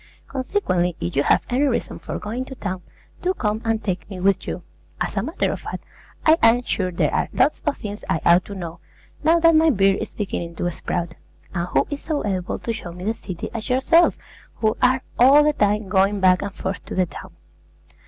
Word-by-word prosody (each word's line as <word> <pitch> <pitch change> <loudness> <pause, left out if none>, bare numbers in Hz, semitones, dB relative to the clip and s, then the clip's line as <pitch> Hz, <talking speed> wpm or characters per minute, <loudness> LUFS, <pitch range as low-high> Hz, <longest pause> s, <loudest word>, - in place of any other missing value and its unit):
Consequently, 250 - 0
if 85 - -3
you 140 - +3
have - - +3
any 250 +3 0
reason 260 -4 -1
for - - -5
going 230 +5 -4
to 265 - -9
town, 185 -6 -4 0.4
do 370 +1 0
come 215 0 -1
and 225 -1 0
take 180 -3 -3
me 190 -3 -7
with 190 0 +1
you. - - -4 0.4
As - - -2
a - - +1
matter - - -1
of - - -4
fact, - - -6 0.4
I 320 +1 +6
am 230 +2 +5
sure 185 -6 -1
there 170 - 0
are - - 0
lots 280 +4 +2
of 295 - +1
things 205 0 -7
I 160 - +1
ought 175 +2 +6
to 200 - -8
know, 170 -2 -6 0.4
now 325 +2 +5
that 330 0 +6
my 320 +1 +5
beard 195 -6 +3
is - - -6
beginning 175 -5 -4
to 175 +2 -1
sprout; 170 0 -3 0.4
and 175 -1 -2
who - - +2
is 285 - -4
so 305 -6 -2
able 185 -3 -2
to 230 - -3
show 175 -6 -7
me 180 +1 -9
the 220 +3 0
city 185 -6 -7
as 225 -2 -5
yourself, 270 +7 +4 0.4
who 220 0 +1
are 255 +1 +3 0.2
all 275 +4 +7
the 300 0 +3
time 210 -3 +1
going 195 +2 +2
back 185 -1 +4
and 200 -1 -4
forth 190 +1 -4
to - - -6
the 185 - +3
town? - - -11
205 Hz, 220 wpm, -22 LUFS, 185-255 Hz, 0.4 s, all